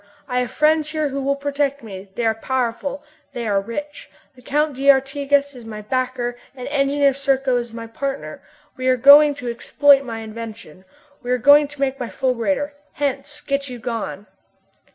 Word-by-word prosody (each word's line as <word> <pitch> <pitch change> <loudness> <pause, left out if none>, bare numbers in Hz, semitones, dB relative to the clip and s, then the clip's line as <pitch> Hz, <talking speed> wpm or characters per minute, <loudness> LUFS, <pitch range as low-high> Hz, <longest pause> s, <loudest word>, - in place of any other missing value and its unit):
I 250 - 0
have 250 -1 -1
friends 305 0 +2
here 310 -2 -1
who 275 0 -3
will 280 +1 0
protect 280 -1 -2
me. 195 -2 -9
They 240 - -1
are 225 - +3
powerful, 260 +4 -3 0.3
they 240 -3 -4
are 200 -2 +1
rich. 290 +8 -7 0.3
The 250 - -17
Count 295 +2 0
d'Artigas 280 +1 +2
is 250 -2 -11
my 215 -1 -8
backer 250 +1 -2 0.2
and 250 -2 -7
Engineer 280 0 +2
Serko 270 -1 +1
is 240 -1 -4
my 230 0 -7
partner. 270 +4 -5 0.4
We 255 0 -2
are 255 0 +4
going 285 +3 +8
to 250 -3 -7
exploit 280 +4 +4
my 225 -3 -6
invention! 220 -5 -9 0.4
We 245 - -8
are 250 - +2
going 285 +4 +6
to 290 0 -14
make 270 0 0
my 245 - -4
fulgurator! 270 +3 -1 0.2
Hence! 285 +1 -3
Get 275 -1 -2
you 250 - -7
gone!" 230 -4 -5
265 Hz, 175 wpm, -21 LUFS, 235-285 Hz, 0.4 s, going